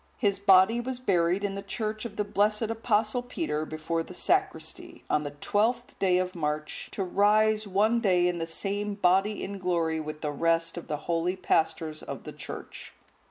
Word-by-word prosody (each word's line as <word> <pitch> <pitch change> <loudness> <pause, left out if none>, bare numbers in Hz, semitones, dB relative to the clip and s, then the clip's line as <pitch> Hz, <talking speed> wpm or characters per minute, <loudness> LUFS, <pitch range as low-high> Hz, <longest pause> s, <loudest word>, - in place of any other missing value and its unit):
His 200 -4 +1
body 200 +3 +5
was 255 +1 -4
buried 180 -4 +1
in 200 -1 -1
the 200 - -4
church 215 +1 -4
of 235 - -6
the 210 - 0
blessed 210 +2 +1
Apostle 225 +1 +1
Peter 245 - -3
before 155 +1 -2
the - - -9
sacristy, - - -1
on 150 - +3
the 145 - -4
12th 220 - 0
day 185 -2 +3
of 185 0 -1
March, 150 -2 -3
to 195 - -1
rise 215 +3 +3
one 215 +5 +2
day 180 -5 +3
in 175 -1 -1
the 165 - -3
same 200 +4 -2
body 195 +2 +2
in 200 0 -5
glory 170 -3 0
with 155 0 -6
the 150 - -1
rest 165 +2 +1
of 175 - -7
the 150 -2 -2
holy 170 +2 0
pastors 160 -3 0
of - - -7
the - - -8
Church. - - -8
190 Hz, 185 wpm, -28 LUFS, 165-210 Hz, -, body